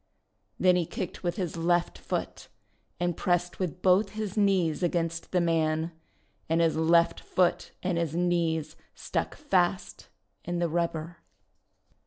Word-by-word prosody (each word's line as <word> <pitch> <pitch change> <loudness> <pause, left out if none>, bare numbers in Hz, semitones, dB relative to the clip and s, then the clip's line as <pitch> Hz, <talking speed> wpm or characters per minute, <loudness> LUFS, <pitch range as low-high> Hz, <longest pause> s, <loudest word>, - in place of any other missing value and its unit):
Then 180 -1 +5
he 170 -3 0
kicked 185 +1 -5
with 175 -1 -1
his 180 -5 -3
left 175 +1 +1
foot, - - -4 0.5
and 175 -1 0
pressed 175 -1 0
with 180 -1 -3
both 195 +3 +4
his 215 -3 -4
knees 190 -7 +2
against 165 -1 -1
the 180 - +3
man. 160 -1 +1 0.6
And 165 +1 +2
his 165 -1 +3
left 170 +1 +3
foot 180 -1 +1
and 180 -2 0
his 165 -2 -2
knees 165 -3 0 0.2
stuck - - -3
fast 185 -10 0 0.3
in 175 0 -3
the 170 -1 0
rubber. 170 0 -2
175 Hz, 140 wpm, -28 LUFS, 165-180 Hz, 0.6 s, Then